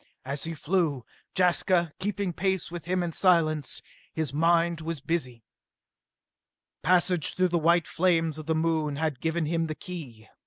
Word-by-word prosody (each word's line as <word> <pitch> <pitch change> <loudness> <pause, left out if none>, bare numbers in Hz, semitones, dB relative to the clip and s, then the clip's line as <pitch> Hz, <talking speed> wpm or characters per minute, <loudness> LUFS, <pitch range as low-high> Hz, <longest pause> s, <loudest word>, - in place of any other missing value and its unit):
As 140 +3 -3
he 165 0 -4
flew, 155 -6 0 0.3
Jaska 175 -2 +2
keeping 200 -2 -2
pace 190 0 -1
with 170 -1 -7
him 180 +1 0
in 170 - -2
silence, 155 -6 +2 0.3
his 155 -4 -2
mind 165 +1 +2
was 165 -1 -4
busy. 130 -6 -2 1.4
Passage 180 -2 +2
through 185 0 +2
the 175 0 +1
white 170 +1 +3
flames 165 -3 +1
of 155 - -9
the 160 - +1
Moon 160 -2 0
had 155 -3 -2
given 160 0 0
him 165 +1 0
the 155 - -4
key. 140 - -9
165 Hz, 155 wpm, -27 LUFS, 155-175 Hz, 1.4 s, white